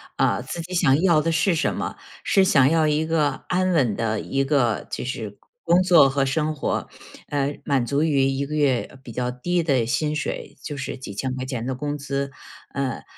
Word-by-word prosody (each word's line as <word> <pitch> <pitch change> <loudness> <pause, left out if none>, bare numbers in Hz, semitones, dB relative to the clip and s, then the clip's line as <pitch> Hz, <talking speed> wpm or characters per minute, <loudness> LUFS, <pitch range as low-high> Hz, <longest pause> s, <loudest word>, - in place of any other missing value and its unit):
啊， - - +1
自 170 - -5
己 180 +3 -8
想 150 -4 +3
要 170 -5 +4
的 165 +1 0
是 170 +4 +2
什 165 - 0
么。 - - -4 0.3
是 195 -2 +4
想 135 -8 +5
要 160 -1 +3
一 150 +1 +1
个 160 -2 0
安 185 0 +1
稳 130 -10 +2
的 110 0 -1
一 135 0 -1
个 135 -6 +1
就 - - -4
是 110 -5 -5 0.3
工 170 +2 +4
作 170 -6 +6
和 135 0 +1
生 155 +3 0
活， 145 - -2 0.4
呃， 145 0 -2
满 135 -4 +1
足 140 +4 +1
于 145 -4 +2
一 135 +1 0
个 150 +2 -5
月， 140 -5 +2
呃， - - -16
比 130 -2 -12
较 125 +2 -2
低 175 +8 -1
的 135 -7 +2
薪 150 +5 0
水， 150 - -4
就 145 - -5
是 135 - -5
几 130 -6 -8
千 130 +5 -3
块 130 - -4
钱 125 -3 -4
的 130 0 -2
工 145 +3 -3
资， 140 -1 -3 0.4
呃， 140 -2 -3
140 Hz, 230 characters per minute, -23 LUFS, 130-160 Hz, 0.4 s, 作